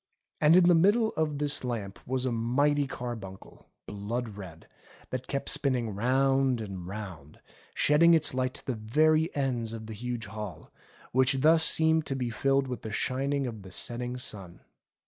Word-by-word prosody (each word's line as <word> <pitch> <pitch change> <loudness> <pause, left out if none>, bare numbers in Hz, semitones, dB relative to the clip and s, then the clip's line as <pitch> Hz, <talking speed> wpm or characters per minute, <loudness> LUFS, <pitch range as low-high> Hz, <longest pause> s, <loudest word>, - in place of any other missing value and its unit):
And 155 +2 +5
in 180 -1 +6
the 180 - +6
middle 205 +7 +4
of 155 -2 -1
this 145 -1 -2
lamp 110 -6 -4
was 130 0 -1
a 130 - 0
mighty 140 +5 +1
carbuncle, 115 -8 -8 0.2
blood 110 +4 -4
red, 90 -5 -11 0.4
that 130 0 -4
kept 140 -1 -3
spinning 125 -6 +3
round 130 +3 +1
and 95 -5 -7
round, 95 -8 -8 0.4
shedding 165 +3 +5
its 155 -4 +2
light 130 0 -1
to - - -9
the 130 - -2
very 155 +9 +2
ends 125 -5 -2
of 110 -1 -7
the 110 - -7
huge 120 +1 -5
hall, 105 -5 -8 0.4
which 130 +1 +2
thus 160 +2 +5
seemed 160 -1 +3
to 135 - -2
be 125 -3 -3
filled 135 +3 +1
with 125 -3 -5
the 110 - -7
shining 135 +5 -1
of 115 -4 -6
the 95 -1 -12
setting 120 +4 -2
sun. 100 -8 -6
125 Hz, 170 wpm, -28 LUFS, 110-145 Hz, 0.4 s, in